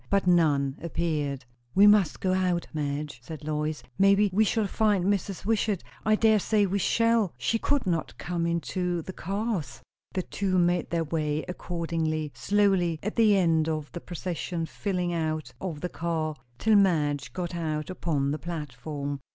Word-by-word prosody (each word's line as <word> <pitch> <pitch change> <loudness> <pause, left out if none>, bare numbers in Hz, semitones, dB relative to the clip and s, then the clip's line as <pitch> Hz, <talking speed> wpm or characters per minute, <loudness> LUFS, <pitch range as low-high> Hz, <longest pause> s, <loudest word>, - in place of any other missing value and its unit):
But 200 -1 +2
none 150 -6 +3
appeared. 150 -5 -2 0.3
"We 200 - +7
must 205 -7 +5
go 185 -1 +1
out, 180 -2 +1
Madge," 145 -3 -3
said 155 +5 -9
Lois. 150 0 -2 0.2
"Maybe 200 +1 +5
we 215 +3 +4
shall 220 0 +1
find 205 -2 +1
Mrs. 195 -1 -1
Wishart 215 -3 +1 0.2
I 215 +1 +4
dare 220 -1 +4
say 210 +1 +2
we 200 +1 0
shall 230 - +2
she 180 - 0
could 285 0 +1
not 170 -4 -1
come 170 -1 -2
into 175 0 -1
the 190 - -7
cars 195 - -3
" - - -39
The 185 - 0
two 190 0 -1
made 175 -1 +2
their 170 0 0
way 155 -1 -1
accordingly, 165 -4 -2
slowly, 180 +4 +2
at 210 - -3
the 215 -3 +5
end 165 -3 +2
of 155 -2 -3
the 175 - -6
procession 175 -1 -4
filing 180 0 -2
out 155 -2 -2
of 165 -6 -4
the - - -1
car, 160 -2 -2 0.2
till 220 - +4
Madge 145 -8 +2
got 175 +5 -4
out 155 -1 -2
upon 150 -6 -1
the 150 - -2
platform. 145 -3 -5
170 Hz, 170 wpm, -27 LUFS, 155-195 Hz, 0.3 s, We